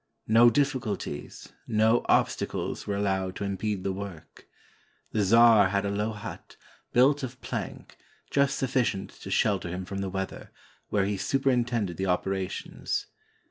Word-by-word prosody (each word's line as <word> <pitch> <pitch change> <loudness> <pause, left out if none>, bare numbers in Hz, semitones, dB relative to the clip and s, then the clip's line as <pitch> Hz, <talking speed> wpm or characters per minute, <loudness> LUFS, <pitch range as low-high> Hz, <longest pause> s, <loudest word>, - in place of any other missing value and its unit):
No 115 +2 +7
difficulties, 120 - -2
no 110 +1 +3
obstacles - - 0
were 100 - -1
allowed 95 -2 -1
to - - -4
impede 100 0 -2
the 95 - -1
work. 95 -4 -9 0.6
The 105 - +1
czar 110 -1 +6
had 100 +1 0
a 100 - -1
low 105 +2 -1
hut, 105 - -9 0.4
built 140 +4 +4
of 130 -1 -6
plank, - - -6 0.3
just 140 -1 +2
sufficient 125 -7 0
to - - -7
shelter 95 -5 +1
him 90 +2 -4
from 95 +1 -5
the 100 -1 -2
weather, 95 0 -5 0.4
where 100 -2 +2
he 100 0 -1
superintended 120 -5 0
the 95 - -1
oper 95 +1 0
ations. 95 -1 -3
105 Hz, 145 wpm, -27 LUFS, 95-120 Hz, 0.6 s, No